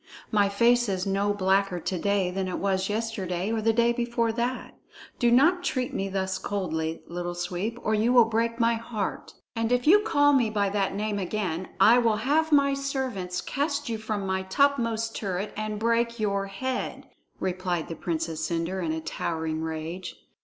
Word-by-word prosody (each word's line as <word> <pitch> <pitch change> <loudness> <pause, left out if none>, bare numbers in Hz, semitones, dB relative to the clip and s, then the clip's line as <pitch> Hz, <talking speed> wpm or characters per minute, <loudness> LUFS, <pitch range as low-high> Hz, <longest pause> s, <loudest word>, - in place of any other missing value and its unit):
My 205 -2 +3
face 235 +3 +3
is 190 -1 -1
no 200 +1 +1
blacker 195 -2 +1
to 180 +1 -3
day 200 -1 +1
than 190 0 -2
it 185 - -3
was 190 -1 0
yesterday 205 -3 -2
or 225 -1 0
the 225 +1 +3
day 235 +1 +3
before 235 -1 0
that. 240 +3 -3 0.5
Do 240 - +4
not 330 +9 +4
treat 255 -7 -1
me 195 0 -2
thus 190 0 -2
coldly, 160 -5 -3
Little 175 0 -4
Sweep, 180 +6 -3
or 215 - +1
you 220 +3 +2
will 245 -2 +7
break 230 +1 -1
my 230 0 +3
heart." 225 -3 -4 0.2
"And 225 0 -1
if 245 0 +2
you 375 +7 +7
call 290 -10 +3
me 245 -5 +3
by 205 -2 +1
that 195 -1 -1
name 210 0 -1
again, 185 -2 -2
I 235 +3 +7
will 225 -3 +2
have 300 +8 +1
my 280 -1 +4
servants 260 -10 -3
cast 290 -1 -2
you 225 -1 -2
from 215 -2 -3
my 190 0 0
topmost 230 +1 +1
turret 195 0 -3
and 215 0 -3
break 235 +1 +1
your 200 -2 0
head," 255 +6 -4 0.3
replied 180 -2 -2
the 165 - -5
Princess 160 -2 -3
Cendre 170 +3 -2
in 160 - -1
a 160 - -3
towering 160 0 -3
rage. 160 +3 -5
210 Hz, 180 wpm, -27 LUFS, 185-235 Hz, 0.5 s, will